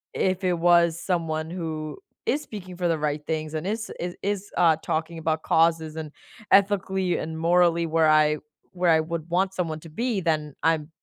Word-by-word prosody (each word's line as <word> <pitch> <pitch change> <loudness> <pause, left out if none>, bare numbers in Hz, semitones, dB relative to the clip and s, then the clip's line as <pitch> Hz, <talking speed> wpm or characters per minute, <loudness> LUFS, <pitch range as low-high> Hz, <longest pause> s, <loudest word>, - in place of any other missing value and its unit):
if 185 0 0
it 180 -1 +2
was 170 -1 +4
someone 160 -3 -2
who 160 -3 -4 0.3
is 295 - +1
speaking 185 -9 -9
for 175 0 -1
the 165 - +1
right 150 0 -1
things, 155 -1 -2
and 155 +4 -3
is 220 +1 -3
is 175 0 -4
is, 200 0 -2
uh, 165 -3 +5
talking 160 +1 -2
about 160 0 -1
causes 160 -1 +2
and 155 -2 -6 0.4
ethically 190 -2 +3
and 160 0 -4
morally 170 0 +3
where 160 -1 +3
I, 155 0 +4 0.3
where 175 -2 +2
I 160 - +5
would 165 0 -5
want 185 +2 +1
someone 165 -4 -2
to 165 - -11
be, 225 +5 -1
then 155 -4 -1
I'm 160 -2 +1
165 Hz, 185 wpm, -25 LUFS, 155-180 Hz, 0.4 s, uh